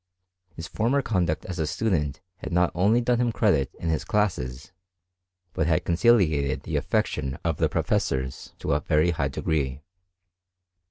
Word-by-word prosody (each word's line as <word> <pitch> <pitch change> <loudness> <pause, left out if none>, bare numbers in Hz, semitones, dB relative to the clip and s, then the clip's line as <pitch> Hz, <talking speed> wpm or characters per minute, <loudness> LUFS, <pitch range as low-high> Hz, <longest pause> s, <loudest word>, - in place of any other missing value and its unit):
His 80 - -6
former 125 - 0
conduct 90 -9 0
as 90 -2 -5
a 80 - 0
student 80 -7 -1 0.2
had - - -7
not 90 0 +2
only 105 +7 +3
done 120 0 +1
him 120 -1 +1
credit 95 - +1
in 85 - -4
his 80 - 0
classes, 75 -12 -1 0.8
but 80 - 0
had 80 -2 +1
conciliated 85 - +2
the - - -4
affection 65 0 -1
of 80 -3 0
the - - +1
professors 65 -1 -2
to - - -3
a - - +2
very 80 +3 +2
high 70 -4 -1
degree. 70 -1 -2
85 Hz, 155 wpm, -25 LUFS, 70-105 Hz, 0.8 s, only